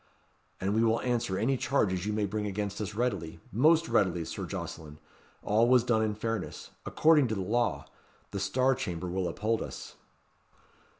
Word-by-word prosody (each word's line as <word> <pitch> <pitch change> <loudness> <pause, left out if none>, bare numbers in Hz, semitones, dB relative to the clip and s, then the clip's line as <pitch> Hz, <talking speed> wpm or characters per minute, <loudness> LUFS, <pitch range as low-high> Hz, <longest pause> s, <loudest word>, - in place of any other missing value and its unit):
"And 95 +2 -1
we 110 +1 +3
will 115 0 +3
answer 120 -6 -1
any 130 +6 +1
charges 105 -9 0
you - - 0
may 105 -1 0
bring 105 +1 -2
against 100 +1 -3
us 105 0 -4
readily 100 -9 -2
most 155 - +4
readily, 90 -4 +1
Sir - - -5
Jocelyn. 75 -2 -6 0.5
All 110 +3 +3
was 125 -2 +5
done 120 -2 +2
in 110 -1 0
fairness 115 +1 -4 0.2
according 155 -4 +4
to 110 - -2
law. 100 -6 0 0.5
The 100 - -3
Star 130 +8 +2
Chamber 90 -9 -4
will 90 0 -1
uphold 110 +6 -1
us." - - -8
105 Hz, 165 wpm, -29 LUFS, 95-120 Hz, 0.5 s, was